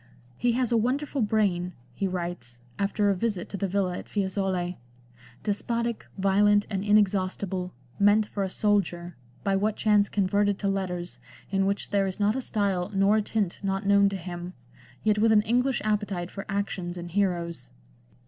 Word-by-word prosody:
" -, -, -30 dB
He 240 Hz, -, +1 dB
has 250 Hz, -1 st, 0 dB
a 235 Hz, -, +4 dB
wonderful 270 Hz, +4 st, 0 dB
brain," 195 Hz, -5 st, +1 dB, 0.2 s
he 195 Hz, -, -1 dB
writes, 175 Hz, -10 st, -5 dB, 0.2 s
after 200 Hz, +1 st, +2 dB
a -, -, +1 dB
visit 195 Hz, -2 st, -2 dB
to -, -, -5 dB
the 195 Hz, -, -1 dB
villa 185 Hz, -1 st, 0 dB
at -, -, -11 dB
Fiesole, 190 Hz, -3 st, -1 dB, 0.3 s
" 120 Hz, 0 st, -24 dB
despotic, 235 Hz, +2 st, -2 dB
violent, 205 Hz, +2 st, +4 dB
and 195 Hz, -1 st, -1 dB
inexhaustible, 190 Hz, -3 st, +1 dB, 0.3 s
meant 205 Hz, +1 st, +5 dB
for 205 Hz, -, -5 dB
a 190 Hz, -, 0 dB
soldier, 180 Hz, -5 st, 0 dB, 0.3 s
by 195 Hz, -1 st, +1 dB
what 210 Hz, +2 st, +1 dB
chance 210 Hz, -2 st, +3 dB
converted 205 Hz, 0 st, +1 dB
to 200 Hz, -, -2 dB
letters, 180 Hz, -3 st, -3 dB, 0.3 s
in 195 Hz, -1 st, +2 dB
which 200 Hz, +1 st, -2 dB
there 200 Hz, -1 st, +2 dB
is 190 Hz, +2 st, -5 dB
not 210 Hz, +2 st, +2 dB
a 265 Hz, -, -1 dB
style 200 Hz, -6 st, -1 dB
nor 195 Hz, +2 st, +4 dB
a -, -, +3 dB
tint 205 Hz, -3 st, -2 dB
not 195 Hz, 0 st, -2 dB
known 200 Hz, 0 st, +5 dB
to 200 Hz, -, -4 dB
him, 175 Hz, 0 st, -6 dB, 0.5 s
yet 210 Hz, -1 st, +2 dB
with 225 Hz, +1 st, +4 dB
an 210 Hz, -1 st, +5 dB
English 250 Hz, +4 st, +1 dB
appetite 205 Hz, -4 st, -1 dB
for 195 Hz, -, -6 dB
xxii -, -, -29 dB
LANDOR. -, -, +3 dB
actions 180 Hz, -3 st, -5 dB
and 175 Hz, 0 st, -7 dB
heroes." 175 Hz, -, -1 dB
200 Hz, 185 wpm, -27 LUFS, 180-210 Hz, 0.5 s, meant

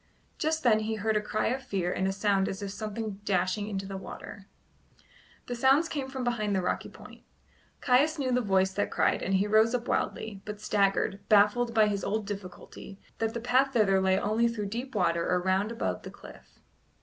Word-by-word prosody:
Just 315 Hz, 0 st, 0 dB
then 225 Hz, -4 st, +4 dB
he 220 Hz, +1 st, -2 dB
heard 220 Hz, +1 st, -1 dB
a 210 Hz, -, +2 dB
cry 215 Hz, 0 st, -1 dB
of 260 Hz, +3 st, -2 dB
fear 190 Hz, -8 st, -2 dB
and 190 Hz, -, 0 dB
a -, -, +1 dB
sound 195 Hz, 0 st, +1 dB
as 195 Hz, +2 st, -5 dB
if 200 Hz, -, -4 dB
of -, -, -7 dB
something 215 Hz, -1 st, -5 dB
dashing 200 Hz, +1 st, 0 dB
into 195 Hz, -2 st, -4 dB
the 195 Hz, 0 st, -6 dB
water. 195 Hz, +1 st, -9 dB, 1.0 s
The 245 Hz, -, -4 dB
sounds 270 Hz, +7 st, +4 dB
came 280 Hz, -4 st, -4 dB
from 265 Hz, -1 st, -5 dB
behind 215 Hz, -4 st, 0 dB
the 190 Hz, -, +1 dB
rocky -, -, -2 dB
point. -, -, -14 dB, 0.6 s
Caius 285 Hz, +5 st, +3 dB
knew 265 Hz, -3 st, -1 dB
the 250 Hz, 0 st, +2 dB
voice 190 Hz, -3 st, +2 dB
that 205 Hz, -, -1 dB
cried -, -, +1 dB
and 195 Hz, -, 0 dB
he 190 Hz, +2 st, +2 dB
rose 220 Hz, +3 st, +3 dB
up 240 Hz, 0 st, -3 dB
wildly, 205 Hz, -3 st, -2 dB
but 210 Hz, -1 st, -7 dB
staggered, 200 Hz, -1 st, +1 dB
baffled 215 Hz, +3 st, +4 dB
by 220 Hz, -1 st, +6 dB
his 200 Hz, -2 st, -1 dB
old 215 Hz, +1 st, -1 dB
difficulty, 195 Hz, 0 st, -9 dB, 0.2 s
that 225 Hz, +1 st, -1 dB
the -, -, -1 dB
path 260 Hz, +3 st, +2 dB
thither 195 Hz, -4 st, +3 dB
lay 190 Hz, 0 st, +3 dB
only 220 Hz, +3 st, +1 dB
through 215 Hz, -4 st, -3 dB
deep 240 Hz, +4 st, -5 dB
water 170 Hz, -4 st, +1 dB
or 180 Hz, -, +2 dB
round 190 Hz, +4 st, 0 dB
above 235 Hz, -, -3 dB
the -, -, -8 dB
cliff. -, -, -15 dB
210 Hz, 210 wpm, -28 LUFS, 195-235 Hz, 1.0 s, by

